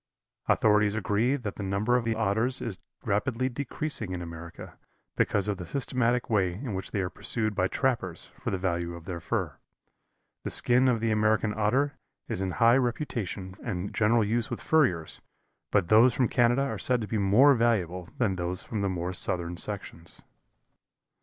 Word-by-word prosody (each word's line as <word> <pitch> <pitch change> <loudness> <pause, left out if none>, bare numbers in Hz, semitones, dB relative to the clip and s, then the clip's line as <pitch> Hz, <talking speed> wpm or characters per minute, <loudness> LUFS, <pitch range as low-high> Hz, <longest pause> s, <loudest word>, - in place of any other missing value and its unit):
Authorities 105 -1 +3
agree 110 +4 +1
that 120 -7 -5
the - - -5
number 100 +5 0
of 125 -2 +1
the 115 -1 0
Otters 110 +4 +1
is 100 -7 -4 0.2
rapidly 125 +5 0
decreasing 130 -5 -4
in 90 - -4
America, 85 0 -10 0.4
because 105 -1 +1
of 100 -2 -1
the 90 - -7
systematic 125 -1 0
way 95 -5 +1
in 110 +4 -5
which 95 0 -4
they 100 - -1
are 90 - -2
pursued 110 -3 -2
by 95 -2 +1
trappers 115 -9 -2
for - - -3
the 95 - -1
value 85 -2 -2
of 85 -1 -11
their 90 -2 -5
fur. - - -3 0.9
The - - -3
skin 125 +2 +3
of 120 -3 +2
the 115 -1 +1
American 110 0 +2
Otter 130 +7 +1 0.3
is 95 - -3
in 95 -2 -2
high 115 +5 +5
reputation 115 - -3
and 90 +2 -4
general 115 +1 +3
use 115 +2 -1
with - - -4
furriers, 105 - +1 0.5
but 85 - +2
those 115 +3 +6
from 125 - +2
Canada 120 +3 +3
are 140 - -3
said 125 -1 +1
to 105 - -4
be 110 - -1
more 110 +9 +6
valuable 95 -8 0
than 105 -8 0
those 90 +1 -3
from 110 -3 -4
the 100 - 0
more 90 0 -3
southern 85 -1 +1
sections. 90 -4 -5
105 Hz, 180 wpm, -28 LUFS, 95-120 Hz, 0.9 s, those